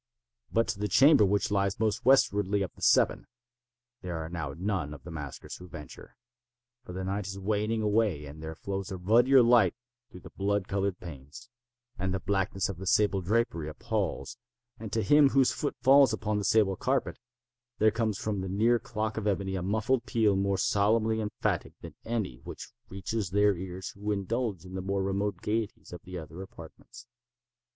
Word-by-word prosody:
But 115 0 +2
to - - -2
the 105 - 0
chamber 135 - +6
which 100 +1 +1
lies 100 -1 0
most 110 -2 0
westwardly 105 -7 +3
of 90 - -6
the - - -19
seven, - - +3 0.7
there 90 -2 -4
are 80 0 -5
now 80 -5 -5
none 90 -6 -2
of - - -15
the 90 - -9
maskers 75 -4 -7
who 90 - -12
venture; 75 -5 -11 0.7
for - - -10
the 95 +1 -5
night 95 +1 -3
is 95 0 -6
waning 110 +3 -1
away; 105 -8 +1
and 75 +2 -10
there 80 0 -6
flows 95 +2 -5
a 95 - -4
ruddier 120 +8 +5
light 115 -6 +4 0.3
through 90 - -12
the - - -12
blood 100 0 -1
colored 100 -1 -1
panes; 80 - -11 0.5
and 95 +1 -1
the - - -2
blackness 95 -1 -1
of 100 - -6
the 95 +1 -7
sable 100 -1 +3
drapery 90 -6 0
appals; 75 - -3 0.4
and 110 -2 -7
to 110 -1 0
him 145 -1 +6
whose 135 -1 +3
foot 145 - -3
falls 135 +1 +6
upon 105 -1 -1
the 100 - -3
sable 105 -4 +3
carpet, - - -1 0.6
there 110 -1 +4
comes 110 -2 -1
from 105 -3 -2
the 95 - -4
near 115 +5 +3
clock 110 -2 -4
of 110 -1 -2
ebony 95 -1 -1
a 95 - -2
muffled 110 +6 0
peal 110 -4 +2
more 100 0 +1
solemnly 110 +3 +2
emphatic 105 0 -2
than - - -9
any 110 - -2
which 70 - -10 0.2
reaches 100 +1 -3
their 100 +1 +3
ears 95 +1 -6
who 105 +1 -4
indulge 100 -1 -2
in 90 - -10
the 95 - -3
more 95 +1 -1
remote 100 +1 -2
gaieties 110 -3 -3
of 90 - -8
the 90 0 -7
other 80 +2 -8
apartments. 95 +6 -12
100 Hz, 185 wpm, -29 LUFS, 90-110 Hz, 0.7 s, chamber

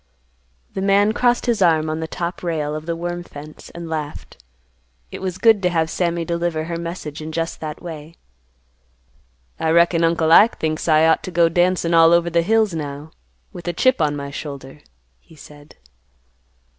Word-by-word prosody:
'" - - -41
The 190 - -3
man 200 +2 +3
crossed 245 +1 +1
his 235 -4 0
arms 160 -3 +3
on 155 0 -3
the 160 - -4
top 170 +2 -5
rail 155 -4 -2
of 155 +1 -6
the 170 - -1
worm 175 +1 -4
fence, 150 -2 -12
and 170 0 -7
laughed. 150 - -6 0.7
It - - -8
was 185 -1 -4
good 220 +1 +4
to 180 - +2
have 165 -2 0
Sammy 170 -2 -1
deliver 170 -1 -2
her 170 +1 -4
message 170 -3 -6
in 155 +1 -6
just 165 +1 -3
that 155 +1 -6
way. 160 -1 -9 1.4
"I 160 - 0
reckon 170 +1 +3
Uncle 165 -1 +2
Ike 215 +7 +6
thinks 155 +1 -2
I 155 0 +4
ought 160 - +3
to - - -7
go 170 -2 +3
dancin' 175 0 +1
all 165 0 +6
over 170 0 +2
the 170 0 +3
hills 215 +1 +2
now, 145 -1 -6 0.4
with 175 - -10
a 175 - -1
chip 255 +1 +2
on 150 -1 +1
my 140 -1 -6
shoulder," 140 -1 -8 0.4
he 160 - -20
said. 145 0 -15
165 Hz, 185 wpm, -20 LUFS, 155-175 Hz, 1.4 s, Ike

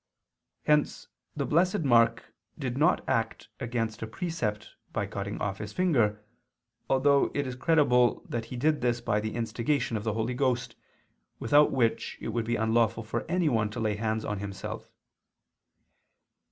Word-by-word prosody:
Hence 150 -1 +1 0.3
the 140 -2 -1
Blessed 175 +5 +2
Mark 115 -4 +3 0.2
did 130 -5 -3
not 160 +6 +2
act 115 -3 -1
against 115 -2 -3
a 115 - -3
precept 110 -6 -3 0.2
by - - -1
cutting 100 +1 -5
off 100 -1 -3
his 105 -1 -6
finger, 115 - +1 0.6
although 140 +1 +4
it 145 - 0
is 130 -1 -4
credible 130 -4 +3
that 115 -1 -3
he 125 - -8
did 150 +4 +1
this 120 -1 +1
by 115 -3 0
the 110 +1 -4
instigation 115 +2 -1
of 105 - -2
the 110 -1 -1
Holy 110 +3 -1
Ghost, 125 -1 0 0.6
without 145 +6 +4
which 120 -4 0
it - - -5
would 115 0 -1
be 120 +1 0
unlawful 110 0 +1
for 110 - -3
anyone 145 - +1
to 105 - -6
lay 110 -2 0
hands 110 +1 -2
on 105 -1 -3
himself. 100 -1 -6
115 Hz, 155 wpm, -28 LUFS, 110-140 Hz, 0.6 s, although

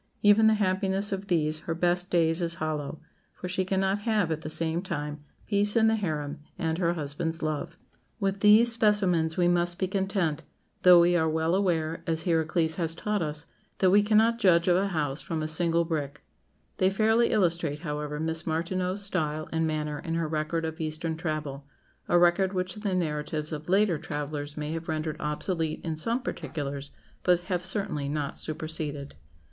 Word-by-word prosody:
even 210 +2 +6
the 220 - +5
happiness 195 0 0
of 195 0 -3
these 155 -3 +1
her 165 - 0
best 175 +2 0
days 165 0 +2
is 170 -1 +2
hollow, 155 -2 -3 0.4
for 180 - -6
she 185 +1 0
cannot 190 +1 0
have, 205 -5 +1
at 155 0 -2
the 155 - -5
same 165 +1 -1
time, 150 -5 -4 0.2
peace 205 0 +2
in 225 -1 +5
the 225 - +3
harem 155 -7 -3 0.2
and 160 +1 -1
her 170 -2 +2
husband's 160 +1 -3
love." 155 -1 -3 0.4
With 195 -1 -1
these 215 +3 +6
specimens 190 -8 +2
we 175 -1 +3
must 175 0 +1
be 190 - 0
content, 190 -5 -1 0.4
though 180 -1 +8
we 175 +1 +4
are 160 -2 +2
well 160 +1 0
aware, 165 -4 0
as 165 0 0
Hierocles 160 -1 +1
has 165 -2 -1
taught 210 +2 -1
us, 150 -1 -3 0.3
that 185 -1 +4
we 205 +2 +6
cannot 220 +2 +3
judge 175 -5 +4
of 175 - +5
a 195 +2 +2
house 150 -6 -2
from 160 -2 -3
a - - -1
single 170 +1 +1
brick. 150 -3 -4 0.5
They 185 - +3
fairly 220 +4 +3
illustrate, 170 -6 +1
however, 150 -2 -4
Miss 160 +1 -2
Martineau's 180 +4 -1
style 155 -5 -2
and 160 0 +1
manner 150 -1 -2
in 165 +2 -3
her 165 -1 0
record 155 +1 -1
of 160 0 -5
Eastern 160 +1 -3
travel 155 -4 -4 0.4
a 175 - +4
record 175 +2 +3
which 185 -1 -2
the 205 -2 -2
narratives 150 -2 -2
of 155 +1 -6
later 195 -4 +3
travellers 145 0 -5
may 150 0 -3
have 165 0 -5
rendered 155 0 -2
obsolete 160 +2 -2
in 160 -1 -2
some 230 +11 -1
particulars, 140 -2 -5 0.3
but 180 -1 +3
have 180 0 -2
certainly 190 -7 -2
not 145 -1 -2
superseded. 155 -2 -5
165 Hz, 180 wpm, -27 LUFS, 155-190 Hz, 0.5 s, though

